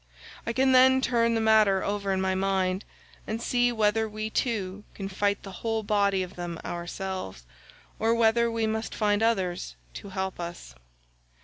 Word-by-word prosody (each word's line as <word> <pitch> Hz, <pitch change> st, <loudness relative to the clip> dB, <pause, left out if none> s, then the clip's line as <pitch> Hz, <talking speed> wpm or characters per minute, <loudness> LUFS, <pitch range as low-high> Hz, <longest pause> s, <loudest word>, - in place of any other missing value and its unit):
I -, -, +1 dB
can 265 Hz, +2 st, +3 dB
then 260 Hz, 0 st, +6 dB
turn 235 Hz, -3 st, +2 dB
the 225 Hz, -, +1 dB
matter 215 Hz, -3 st, +4 dB
over 200 Hz, -1 st, -1 dB
in 190 Hz, -, +1 dB
my 190 Hz, 0 st, +1 dB
mind, 190 Hz, 0 st, 0 dB, 0.4 s
and 220 Hz, +1 st, -2 dB
see 245 Hz, +1 st, +2 dB
whether 220 Hz, -1 st, +1 dB
we 215 Hz, +1 st, -4 dB
two 205 Hz, -6 st, -2 dB
can 195 Hz, -, -5 dB
fight 200 Hz, +1 st, -1 dB
the 195 Hz, -, -8 dB
whole 225 Hz, -1 st, -1 dB
body 200 Hz, -2 st, +2 dB
of 185 Hz, +1 st, -9 dB
them 175 Hz, -1 st, -5 dB
ourselves, 175 Hz, -, -5 dB, 0.6 s
or 225 Hz, +1 st, +2 dB
whether 235 Hz, +1 st, +3 dB
we 230 Hz, -1 st, -1 dB
must 220 Hz, +1 st, -2 dB
find 205 Hz, -1 st, +1 dB
others 185 Hz, -, 0 dB, 0.2 s
to 200 Hz, -, -8 dB
help 190 Hz, -1 st, -4 dB
us." 170 Hz, 0 st, -7 dB
205 Hz, 170 wpm, -27 LUFS, 190-225 Hz, 0.6 s, then